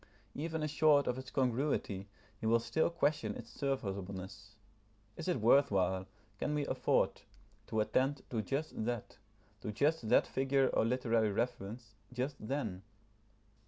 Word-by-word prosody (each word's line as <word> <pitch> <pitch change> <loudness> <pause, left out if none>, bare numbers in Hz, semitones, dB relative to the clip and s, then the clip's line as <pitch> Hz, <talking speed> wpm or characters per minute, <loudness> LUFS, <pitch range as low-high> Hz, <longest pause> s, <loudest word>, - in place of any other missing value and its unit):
Even 160 +1 -3
assured 150 -1 +4
of 125 +1 0
its 130 -1 -8
congruity, 125 -6 0 0.3
he 110 - -2
will 115 +1 +5
still 160 +8 +1
question 155 -3 0
its - - -9
serviceableness. 100 -6 -4 0.6
Is - - -6
it 180 -8 +1
worth 140 +6 +6
while, 95 -1 +1 0.3
can 150 - 0
we 145 -1 0
afford, - - +1 0.5
to 110 -1 +1
attend 130 +5 +1
to 115 -3 0
just 135 +3 -3
that, 120 -3 -4 0.4
to 105 - -3
just 140 +1 +1
that - - +5
figure 135 0 +2
or - - +2
literary 115 -3 +2
reference, 115 0 -3 0.2
just 130 +3 -2
then? 110 -6 -3
125 Hz, 140 wpm, -34 LUFS, 105-140 Hz, 0.6 s, worth